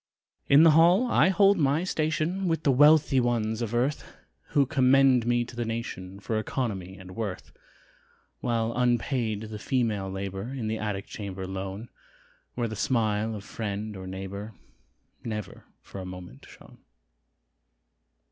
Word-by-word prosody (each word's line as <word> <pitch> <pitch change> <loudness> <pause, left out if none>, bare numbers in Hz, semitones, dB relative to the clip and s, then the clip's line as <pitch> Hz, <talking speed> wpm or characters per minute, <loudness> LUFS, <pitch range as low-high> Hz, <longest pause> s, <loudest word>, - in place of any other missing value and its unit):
In 140 +3 +7
the 165 - +7
hall 170 +9 +5
I 235 - +4
hold 195 0 +4
my 145 +3 +2
station, 165 +2 -1
With 165 -2 0
the 140 - +4
wealthy 145 0 +5
ones 115 -2 0
of 115 0 -2
earth, 130 +5 0 0.4
Who 140 -1 +2
commend 130 -3 +4
me 120 0 +2
to 120 - -12
the 120 - -2
nation 105 -5 -5
For 110 +2 -2
economy 100 -6 -4
and 90 -1 -11
worth, 105 -5 -5 0.9
While 115 -1 -1
unpaid 120 -3 0
the 110 -1 -7
female 110 -6 -1
labor, 95 +2 -5
In 120 -5 -3
the 110 0 -2
attic 105 -2 -3
chamber 95 -3 -6
lone, 95 +4 -6 0.7
Where 120 -1 -1
the 110 - -6
smile 110 -2 0
of 100 - -7
friend 105 0 -5
or 95 -1 -8
neighbor 95 +3 -7 0.7
Never 105 -2 -6 0.2
for 95 - -8
a - - -7
moment 90 -7 -10
shone. - - -16
115 Hz, 145 wpm, -27 LUFS, 100-135 Hz, 0.9 s, In